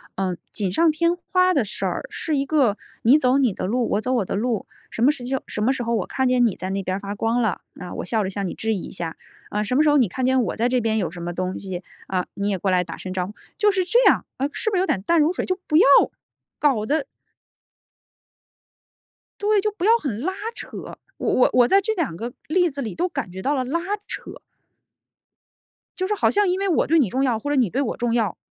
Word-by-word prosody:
呃， 185 -2 -1 0.2
锦 195 -4 -2
上 330 - +4
添 335 +3 +1
花 365 +1 +2
的 265 -6 +2
事 - - -4
儿， - - -3
是 310 -3 -1
一 275 - 0
个 260 -9 +2 0.3
你 250 +6 +7
走 260 -2 +3
你 255 -5 +3
的 - - -4
路， 235 +5 0
我 205 - +1
走 255 +3 -1
我 230 - +2
的 - - -3
路， 225 0 -1 0.2
什 - - -5
么 280 - +6
时 255 -5 -7
候 - - -2
什 210 - -4
么 260 +5 +3
时 260 - -4
候 230 0 0
我 - - -1
看 265 -1 0
见 250 -1 +4
你 215 - +1
在 185 - -5
那 195 0 -2
边 185 +1 -2
儿 - - -6
发 200 0 -5
光 225 +3 0
了， 220 -6 -1 0.2
啊， 180 - -7
我 - - -4
笑 215 +2 0
着 190 - -2
向 195 0 -3
你 - - -4
致 220 0 -1
意 190 - -4
一 - - -8
下。 170 -3 -5 0.3
啊， 210 +1 -1
什 215 +4 -3
么 285 - +5
时 305 - +4
候 295 - +5
你 245 -6 +4
看 255 +8 -4
见 260 -1 +3
我 - - -2
在 235 +2 +1
这 250 0 +2
边 220 -1 0
有 175 -5 -1
什 175 -1 -8
么 175 0 -3
东 185 +1 -3
西， 185 -2 -5 0.2
啊， 185 -1 -1
你 200 +1 -1
也 195 - 0
过 195 - 0
来 180 -1 +3
打 165 -1 -8
声 185 - -7
招 185 -1 -1
呼。 210 - -9 0.2
就 415 -1 +4
是 380 -2 +1
这 470 +8 +3
样， - - +5
呃， 275 - 0
是 435 - -1
不 415 - -2
是 - - +3
有 375 - +2
点 190 - 0
淡 335 - +2
如 310 +4 +3
水， - - -2
就 370 0 -1
不 305 - +3
要 400 - +7 0.7
搞 255 -8 +2
得 295 +2 0 2.4
对， 415 0 +3
就 425 - 0
不 385 -2 -4
要 460 +2 +6
很 250 - -4
拉 370 +5 -1 0.2
扯， - - -8 0.5
我 - - -1
我 250 - +4
我 245 -1 +5
在 390 - +5
这 440 +3 -1
两 320 - -1
个 230 +7 -5 0.2
例 355 +2 +3
子 280 -1 -5
里 225 - -4
都 355 +2 0
感 270 - -4
觉 190 +1 -7
到 285 +8 +1
了 260 - 0
拉 280 +7 -1 0.3
扯。 - - -7 1.6
就 370 0 -1
是 420 - 0
好 - - +2
像 410 -1 +3
因 370 +2 0
为 395 - 0
我 335 - +2
对 325 +1 +4
你 235 -9 +2
重 265 +5 0
要 240 -4 +1
或 290 +5 -4
者 290 - +1
你 250 -7 +3
对 265 - -1
我 260 - -2
重 240 -1 0
要， 225 -6 0
250 Hz, 285 characters per minute, -23 LUFS, 205-310 Hz, 2.4 s, 你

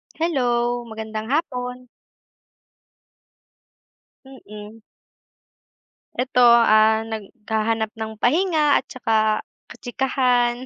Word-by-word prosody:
Hello 245 -6 -1
magandang 220 0 -6
hapon. 250 -5 -3 2.4
Mm. 220 -4 -12 1.3
Eto, 250 0 -1 0.2
ah, 220 0 +4
naghahanap 220 0 -3
ng 220 0 -4
pahinga 310 +1 +2
at - - -13
saka 220 -4 0 0.3
kachikahan. 245 -1 0
240 Hz, 70 wpm, -21 LUFS, 220-255 Hz, 2.4 s, ah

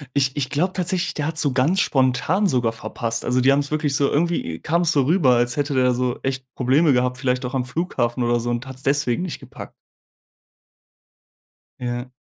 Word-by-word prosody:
Ich 135 -2 +1
ich 130 -2 -2
glaube 175 +6 0
tatsächlich, 180 -1 -2
der 150 - -2
hat's 160 0 -1
so 145 -4 +1
ganz 145 +9 +2
spontan 135 +8 +1
sogar 125 -8 +1
verpasst. 115 0 -4
Also, 125 +1 +1
die 130 +2 +5
haben's 140 +1 +1
wirklich 150 -2 0
so 140 - +2
irgendwie 155 - -1
kam's 170 +1 +1
so 145 - +3
rüber, 150 -2 +3
als 120 +2 0
hätte 145 0 -1
der 125 -1 +3
so 125 0 -1
echt 135 -1 -3
Probleme 135 +4 +3
gehabt, 125 0 +1
vielleicht 125 -1 -1
auch 125 - -4
am 130 -2 0
Flughafen 125 -4 -2
oder 120 0 +1
so 120 +1 -2
und 120 +2 -3
hat's 130 0 -10
deswegen 140 +2 +1
nicht 180 - -5
gepackt. - - -11 2.1
Ja. 125 +1 -4
135 Hz, 190 wpm, -22 LUFS, 125-155 Hz, 2.1 s, die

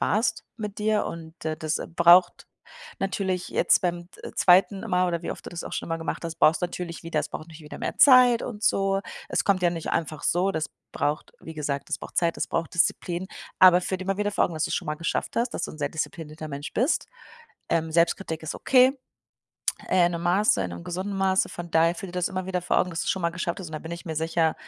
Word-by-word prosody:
warst 225 +1 0
mit 210 -3 -6
dir 215 0 +1
und, 165 0 -9
äh, 155 0 -2
das 155 0 -2 0.2
braucht 175 +1 +5 0.5
natürlich 190 -2 -2
jetzt - - +3
beim, 175 -1 -2
äh, - - -7
2. 190 +2 +4
Mal, 180 0 +2
oder 170 -1 -2
wie - - -4
oft - - -13
du - - -7
das 175 -1 -6
auch - - -8
schon - - -4
immer 165 0 -2
gemacht 165 +1 -4
hast, 165 -1 -4
brauchst 155 +2 +4
natürlich 175 -1 -4
wieder 165 -2 -1
es - - -4
braucht 155 - -7
natürlich 160 -1 -12
wieder 150 - -9
mehr - - -4
Zeit 250 -3 +7
und 215 -3 -6
so. 195 -1 +2 0.3
Es - - 0
kommt 195 -2 +2
ja 175 - +4
nicht 165 -2 -4
einfach 155 -2 -2
so, 185 +3 +2
das 160 -3 -2 0.2
braucht 145 +2 -2
wie 160 - -9
gesagt, 145 -2 -3
das - - -2
braucht - - -11
Zeit, 170 -1 +2
das - - -1
braucht 165 -1 -2
Disziplin. 170 +1 +1 0.3
Aber 180 -1 +8
führ 190 +1 -2
dir 185 - -6
immer 195 0 -1
wieder 205 0 0
vor - - +2
Augen, 170 - -3
dass 155 0 0
du's - - -1
schon - - -3
mal 150 - -1
geschafft 165 +2 -3
hast, 235 +1 +1
dass - - -2
du - - -6
'n 155 - -12
sehr 145 -1 -1
disziplinierter 155 -1 -5
Mensch 140 0 -6
bist. 255 +8 +1 0.6
Ähm, 160 -1 0
Selbstkritik 170 0 +1
ist 160 - -4
okay, 260 +1 +4 0.9
äh, 180 -2 +4
in 175 - -1
'nem 170 - -3
Maße, 180 - +3
in 90 - -3
'nem 85 0 -8
gesunden 190 +3 -4
Maße. 190 0 +2
Von 175 -1 -8
daher 165 +1 +3
führ 190 +2 -7
dir - - -10
das 180 -1 0
immer 185 -1 -4
wieder 185 -1 -1
vor 180 - 0
Augen, 185 - 0
dass 165 - -3
du's - - -4
schon 190 - -2
mal 170 - +1
geschafft 170 0 -3
hast 180 - -7
und 155 - -13
da 155 - -3
bin 160 - -7
ich 170 - -7
mir 160 -1 -4
sicher, 160 0 +1
175 Hz, 250 wpm, -26 LUFS, 160-190 Hz, 0.9 s, Aber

